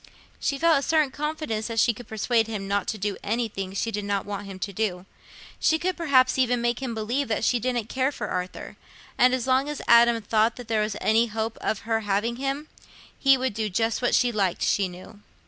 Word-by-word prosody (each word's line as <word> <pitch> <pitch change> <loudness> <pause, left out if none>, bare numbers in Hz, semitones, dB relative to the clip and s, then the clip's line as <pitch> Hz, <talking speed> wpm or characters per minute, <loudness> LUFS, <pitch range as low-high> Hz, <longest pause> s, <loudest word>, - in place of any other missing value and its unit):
She 280 - -1
felt 325 0 +4
a - - -4
certain 305 -1 +2
confidence 300 -8 -3
that 230 -1 -2
she 235 - +4
could 235 +1 -12
persuade 225 +1 +1
him 210 -3 -4
not 200 0 -1
to 220 - -2
do 205 0 -2
anything 205 -4 -2
she 225 +3 -1
did 210 -1 -3
not 200 -1 -1
want 205 0 -5
him 195 -1 -8
to 200 +2 -5
do; 185 -3 -2 0.5
she 320 - +3
could 365 +2 -1
perhaps 265 -6 +3
even 245 -1 +2
make 240 0 0
him 245 -4 -3
believe 240 +6 -1
that 220 - -1
she 245 +1 +2
didn't 240 -1 -1
care 260 +3 0
for 210 -7 -5
Arthur; 180 0 -5 0.4
and 250 +1 +5
as 255 - -3
long 265 +2 +2
as 295 - -4
Adam 235 0 +6
thought 220 +1 +1
there 225 -3 -1
was 210 -1 -2
any 225 +2 +3
hope 220 +1 -3
of 215 - -1
her 225 0 0
having 210 +3 -1
him, 275 +3 -3 0.5
he 270 -1 +5
would 260 -2 -1
do 215 0 -2
just 225 +5 0
what 245 - +2
she 245 -1 +3
liked, 195 -5 0
she 200 -2 +2
knew. 185 +4 -12
230 Hz, 220 wpm, -25 LUFS, 210-255 Hz, 0.5 s, Adam